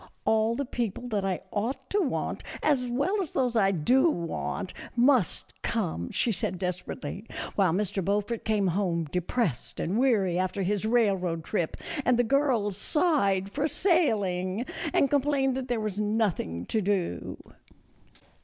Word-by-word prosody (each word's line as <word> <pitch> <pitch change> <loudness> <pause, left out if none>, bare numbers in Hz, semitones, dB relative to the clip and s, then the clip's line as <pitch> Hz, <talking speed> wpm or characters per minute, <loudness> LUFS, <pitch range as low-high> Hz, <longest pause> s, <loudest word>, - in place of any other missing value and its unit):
" - - -41
All 220 +1 +3
the 280 - -2
people 240 -1 -3
that 205 -3 0
I 190 -2 -1
ought 255 +5 -2
to 415 - +2
want, 285 -8 -2 0.2
as 270 -5 +2
well 285 - 0
as 340 - -5
those 250 -3 +1
I 200 -4 +4
do 245 - +3
want, 175 - -3 0.2
must 245 - +2
come," 85 +2 -2
she 235 - 0
said 185 -2 -2
desperately; 180 +1 -4 0.3
while 190 -4 +3
Mr. 195 +1 -1
Beaufort 205 +4 -1
came 210 -2 +1
home 175 -2 0
depressed 180 - -2
and 195 +7 0
weary 200 -9 +2
after 185 +1 -1
his 205 +2 0
railroad 195 -8 +1
trip, 170 -2 -2 0.3
and 250 -2 +3
the 245 - +4
girls 235 -6 +1
sighed 200 - +1
for 295 +5 0
sailing 215 - +1 0.3
and 275 - +3
complained 275 -2 +2
that 260 -1 -3
there 240 -2 0
was 210 -2 -3
nothing 205 - 0
to 220 - 0
do. 185 - -1
210 Hz, 155 wpm, -28 LUFS, 185-250 Hz, 0.3 s, I